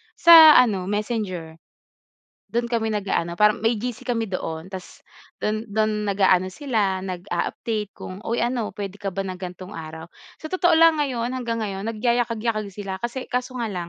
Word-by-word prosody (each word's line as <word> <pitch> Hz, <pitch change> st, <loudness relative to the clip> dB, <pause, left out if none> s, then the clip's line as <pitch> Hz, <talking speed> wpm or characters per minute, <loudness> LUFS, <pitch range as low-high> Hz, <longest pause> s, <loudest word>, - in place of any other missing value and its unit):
Sa 340 Hz, -, +5 dB, 0.2 s
ano 200 Hz, -7 st, +3 dB
Messenger. 205 Hz, -6 st, -3 dB, 0.9 s
Dun 235 Hz, 0 st, -2 dB
kami 225 Hz, -2 st, 0 dB
nag-aano 175 Hz, -4 st, -1 dB
parang 210 Hz, +3 st, +3 dB
may 225 Hz, +1 st, +3 dB
GC 250 Hz, +1 st, -5 dB
kami 230 Hz, -3 st, -1 dB
doon 165 Hz, -1 st, -4 dB
tas 190 Hz, -2 st, -9 dB, 0.4 s
dun 215 Hz, +2 st, -1 dB
dun 215 Hz, 0 st, -1 dB
nag-aano 190 Hz, -2 st, +3 dB
sila 200 Hz, -5 st, -1 dB
nag-a-update 195 Hz, +3 st, -3 dB
kung 185 Hz, +2 st, -9 dB
uy 230 Hz, +1 st, -2 dB
ano 240 Hz, -2 st, -1 dB
pwede 200 Hz, -2 st, -5 dB
ka 195 Hz, -, -2 dB
ba 195 Hz, +1 st, -3 dB
ng 185 Hz, -, -4 dB
gantong 180 Hz, +1 st, -8 dB
araw? 160 Hz, 0 st, -8 dB, 0.3 s
Sa 315 Hz, -, -8 dB
totoo 350 Hz, -3 st, +3 dB
lang 325 Hz, -1 st, +5 dB
ngayon 250 Hz, -4 st, -1 dB
hanggang 240 Hz, -3 st, -3 dB
ngayon 200 Hz, +1 st, -4 dB
nagayakag-yakag 230 Hz, -2 st, -1 dB
sila 195 Hz, -1 st, -6 dB
kasi 240 Hz, +2 st, -4 dB
kaso 250 Hz, +1 st, -2 dB
nga 235 Hz, -, -1 dB
lang, 175 Hz, -2 st, -5 dB
210 Hz, 165 wpm, -23 LUFS, 190-235 Hz, 0.9 s, Sa